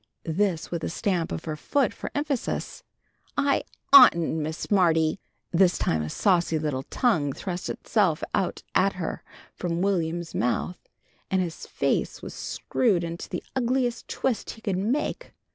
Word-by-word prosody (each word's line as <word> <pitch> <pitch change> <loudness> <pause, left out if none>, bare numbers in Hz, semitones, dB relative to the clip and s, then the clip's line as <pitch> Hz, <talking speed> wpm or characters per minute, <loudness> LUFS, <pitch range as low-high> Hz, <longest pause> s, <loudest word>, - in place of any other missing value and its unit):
This 170 0 0
with 170 -2 -3
a - - -1
stamp 175 -1 -1
of - - -4
her 155 -2 -3
foot 275 - 0
for - - -6
emphasis. 290 - -2 0.5
"I 280 0 +2 0.3
oughtn't, 170 - +8
Miss 155 +1 -3
Smarty!" 165 -3 +2 0.3
This 180 0 +4
time 80 - 0
a 75 - -3
saucy 175 - +2
little 150 -4 -1
tongue 160 - +1
thrust 180 +2 -4
itself 190 -8 +1
out 185 - -1
at 195 +1 +3
her 180 -3 -4 0.3
from 175 0 -2
Will'm's 170 -3 -1
mouth, 125 +9 -1 0.5
and 190 - +2
his 175 -3 -3
face - - -1
was - - -6
screwed 200 -9 0
into 170 0 -5
the 180 - -4
ugliest 250 -1 0
twist 255 -4 -1
he 225 - -8
could 200 -5 -1
make. 275 - -2
180 Hz, 150 wpm, -26 LUFS, 165-220 Hz, 0.5 s, oughtn't